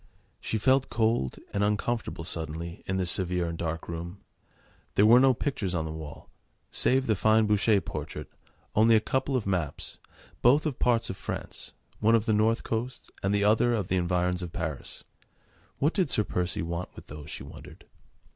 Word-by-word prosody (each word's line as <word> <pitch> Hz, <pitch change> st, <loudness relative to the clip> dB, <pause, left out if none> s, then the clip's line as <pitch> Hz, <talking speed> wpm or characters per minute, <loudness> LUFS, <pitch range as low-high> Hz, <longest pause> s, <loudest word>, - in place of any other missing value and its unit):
She 110 Hz, -, -2 dB
felt 130 Hz, +4 st, +3 dB
cold 110 Hz, -, 0 dB, 0.2 s
and 100 Hz, -, +1 dB
uncomfortable 105 Hz, -3 st, -1 dB
suddenly 85 Hz, 0 st, -4 dB
in 95 Hz, -, -1 dB
this 90 Hz, -2 st, +2 dB
severe 90 Hz, -1 st, +1 dB
and 85 Hz, -, -4 dB
dark 80 Hz, 0 st, -4 dB
room. 85 Hz, +3 st, -6 dB, 0.8 s
There 105 Hz, -, +5 dB
were 120 Hz, +3 st, +8 dB
no 130 Hz, -1 st, +5 dB
pictures 105 Hz, -9 st, -2 dB
on 80 Hz, -2 st, -1 dB
the 80 Hz, -, -4 dB
wall, 80 Hz, -2 st, -9 dB, 0.4 s
save 130 Hz, +1 st, +2 dB
the 110 Hz, -, +2 dB
fine 110 Hz, +3 st, +4 dB
Boucher 105 Hz, 0 st, +3 dB
portrait, -, -, -6 dB, 0.5 s
only 110 Hz, +2 st, +5 dB
a -, -, +6 dB
couple 130 Hz, +5 st, -1 dB
of 125 Hz, -, 0 dB
maps, 90 Hz, -7 st, -3 dB, 0.4 s
both 140 Hz, +6 st, +5 dB
of 150 Hz, -5 st, -2 dB
parts 115 Hz, -2 st, +2 dB
of 95 Hz, -, -8 dB
France, -, -, -6 dB, 0.3 s
one 110 Hz, +2 st, +4 dB
of 110 Hz, -1 st, +1 dB
the 110 Hz, -, +2 dB
North 110 Hz, +2 st, +2 dB
coast 120 Hz, +3 st, -4 dB
and 95 Hz, -, 0 dB
the 100 Hz, 0 st, +2 dB
other 110 Hz, +3 st, +3 dB
of 100 Hz, -5 st, -2 dB
the 95 Hz, -, +1 dB
environs 90 Hz, 0 st, 0 dB
of 90 Hz, -2 st, -5 dB
Paris. 80 Hz, -7 st, -5 dB, 0.7 s
What 150 Hz, +4 st, +1 dB
did 185 Hz, -7 st, +1 dB
Sir 105 Hz, -, +3 dB
Percy 90 Hz, -3 st, -2 dB
want 85 Hz, +2 st, -4 dB
with -, -, -11 dB
those, 75 Hz, 0 st, -9 dB
she -, -, -6 dB
wondered. -, -, -12 dB
105 Hz, 185 wpm, -28 LUFS, 85-115 Hz, 0.8 s, were